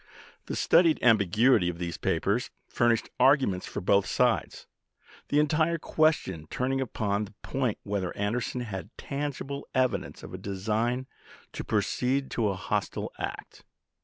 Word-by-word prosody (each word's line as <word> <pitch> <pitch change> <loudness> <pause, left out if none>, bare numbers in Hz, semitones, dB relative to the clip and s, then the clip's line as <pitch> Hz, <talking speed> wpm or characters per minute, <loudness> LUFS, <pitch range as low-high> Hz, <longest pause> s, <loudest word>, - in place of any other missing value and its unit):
The - - -3
studied 165 -2 +4
ambiguity 110 -2 +4
of 85 - -5
these 85 -1 -4
papers 110 +6 0 0.2
furnished 120 -2 +1
arguments 130 -8 +3
for - - -5
both 100 +1 +3
sides, - - +1 0.6
the 145 - +2
entire 160 +2 +2
question 150 - +1
turning 135 +1 -1
upon 105 -4 -1
the 100 +1 -16
point 130 -5 -1
whether 100 -3 -3
Anderson 115 +4 -1
had 100 -4 -6
"tangible 140 0 -4
evidence 130 -1 0
of - - -9
a 95 - -6
design 110 +6 -1 0.5
to - - -5
proceed 125 +6 0
to 110 -3 +1
a 100 - -1
hostile 95 - -2
act." - - -6
115 Hz, 135 wpm, -28 LUFS, 100-135 Hz, 0.6 s, studied